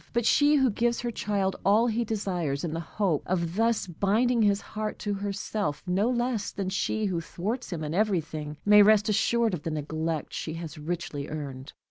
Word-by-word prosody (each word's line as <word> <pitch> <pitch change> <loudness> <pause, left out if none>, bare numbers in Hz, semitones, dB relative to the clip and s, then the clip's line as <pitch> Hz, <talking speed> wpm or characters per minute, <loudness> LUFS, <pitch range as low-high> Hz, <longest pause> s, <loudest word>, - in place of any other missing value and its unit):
But 235 -1 +1
she 290 +4 +5
who 265 -4 +3
gives 235 +3 0
her 240 -1 -2
child 200 -3 -1
all 210 +4 +4
he 235 0 +1
desires, 180 -10 -2
in 165 -3 -2
the 165 - -2
hope 170 -1 -1
of 170 -2 -1
thus 225 +1 +2
binding 215 +7 +1
his 205 -1 +2
love 215 0 -2
to 205 - -2
herself, 200 -5 -3
no 190 +5 +1
less 240 -4 0
than 195 -2 -3
she 210 +3 -1
who 180 -4 -1
thwarts 210 +9 -4
him 165 -3 -3
in 150 +1 -3
everything, 160 -7 -1
may 210 0 +8
rest 210 +1 +5
assured 230 +1 +2
of 170 - -3
the 165 - -3
neglect 155 0 -3
she 160 - -4
has 165 -2 -7
richly 150 -3 -4
earned. 140 -3 -6
195 Hz, 190 wpm, -27 LUFS, 165-220 Hz, -, may